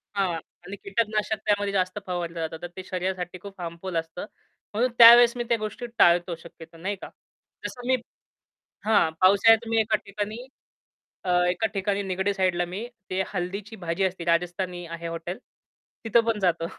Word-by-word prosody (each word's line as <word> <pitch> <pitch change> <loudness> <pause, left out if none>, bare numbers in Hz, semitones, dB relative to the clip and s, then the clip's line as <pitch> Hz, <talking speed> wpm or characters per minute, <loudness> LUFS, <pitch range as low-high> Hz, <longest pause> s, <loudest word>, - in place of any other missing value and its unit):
हां. 190 -3 +1 0.3
आणि 195 - -6
कीटकनाशक 215 +1 0
त्यामध्ये 205 -1 +1
जास्त 185 +1 0
फवारलं 170 -2 -3
जातं. 160 0 -4
तर 175 - -4
ते 185 - -5
शरीरासाठी 185 -1 -3
खूप 195 -1 -10
हार्मफुल 170 +2 -6
असतं. 165 +3 -4 0.5
म्हणून 240 +4 +1
त्यावेळेस 235 +1 +10
मी 240 - -1
त्या 235 - +3
गोष्टी 215 +3 -5
टाळतो 175 0 +4
शक्यतो, 165 0 -14
नाही 190 +5 -3
का? - - -7 0.6
जसं 245 0 -6
मी 260 - +4 0.9
हां, 205 -7 +4
पावसाळ्यात 200 +4 +6
तुम्ही 225 0 0
मी - - +6
एका 215 0 +1
ठिकाणी, 205 +2 -4 0.9
अ, - - -2 0.2
एका 180 +5 0
ठिकाणी 200 +1 -1
निगडी 190 +2 0
साइडला 185 -2 +1
मी 215 +5 -4 0.2
ते 185 +1 0
हल्दीची 195 +4 -4
भाजी 170 +3 0
असते, 180 -2 -3
राजस्थानी 175 +1 -1
आहे 170 0 -6
हॉटेल 165 +2 -5 0.7
तिथं 230 +1 +4
पण 225 -2 0
जातो. 170 -3 +1
190 Hz, 165 wpm, -26 LUFS, 175-210 Hz, 0.9 s, त्यावेळेस